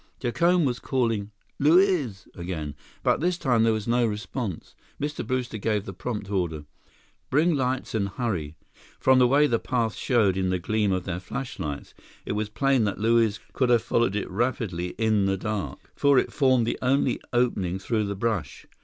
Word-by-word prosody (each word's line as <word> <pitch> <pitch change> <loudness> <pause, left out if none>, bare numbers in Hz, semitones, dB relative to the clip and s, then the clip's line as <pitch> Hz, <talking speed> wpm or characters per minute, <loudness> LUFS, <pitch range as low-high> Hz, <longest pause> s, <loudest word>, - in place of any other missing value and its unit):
Jacome 170 +7 +2
was 125 -2 -1
calling 115 -6 -1 0.3
"Luiz!" 150 - +3
again, 85 -5 -5 0.3
but - - +2
this 175 +3 0
time 125 -8 +2
there 115 - +4
was 110 -1 -2
no 120 +1 +2
response. 105 -2 -5 0.3
Mr. 145 +1 -3
Brewster 125 -4 -2
gave 105 -1 0
the 95 - -6
prompt 105 0 -5
order: 85 -6 -2 0.6
"Bring 160 +5 +3
lights 130 -2 -1
and 100 -3 0
hurry!" 95 - -3 0.4
From 130 -1 +5
the 125 - +6
way 140 +4 +4
the 120 -5 +1
path 115 -4 -1
showed 105 -7 +2
in 95 -1 0
the 90 - +1
gleam 105 +3 0
of 95 -1 0
their 90 -1 -3
flashlights, 90 - -5 0.3
it - - -3
was 105 +1 -2
plain 135 +1 +2
that 100 - -2
Luiz 115 -1 +3
could 130 -2 +1
have 120 -2 +4
followed 115 -4 +1
it 105 - -2
rapidly 95 -5 -2
in 110 -3 +2
the 95 0 +1
dark, 105 0 -3 0.2
for 140 -1 +4
it - - +1
formed 130 -4 +3
the - - -2
only 130 +2 +1
opening 105 -7 +1
through 105 +2 -1
the 100 0 -3
brush. 95 - -2
115 Hz, 180 wpm, -26 LUFS, 95-130 Hz, 0.6 s, the